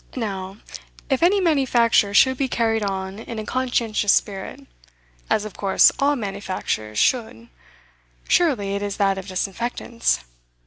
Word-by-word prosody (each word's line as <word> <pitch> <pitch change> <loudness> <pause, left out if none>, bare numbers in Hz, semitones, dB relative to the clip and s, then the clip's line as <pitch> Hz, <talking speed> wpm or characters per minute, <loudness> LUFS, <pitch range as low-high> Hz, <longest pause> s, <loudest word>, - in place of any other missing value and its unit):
Now, 195 -5 -4 0.5
if 265 - +1
any 375 +4 +4
manufacture 255 - +3
should 260 +3 +5
be 270 +1 -1
carried 225 -3 0
on 195 0 -4
in 230 0 -7
a 215 - -4
conscientious 235 -5 0
spirit 195 -2 -2 0.6
as 210 - +1
of 215 - -7
course 195 -1 +4
all 285 +1 +3
manufactures 195 - -4
should 230 - 0 0.8
surely 255 - +2
it 200 - -3
is 205 -1 -4
that 195 -1 +1
of 190 - -9
disinfectants. 230 - -2
215 Hz, 135 wpm, -22 LUFS, 195-250 Hz, 0.8 s, should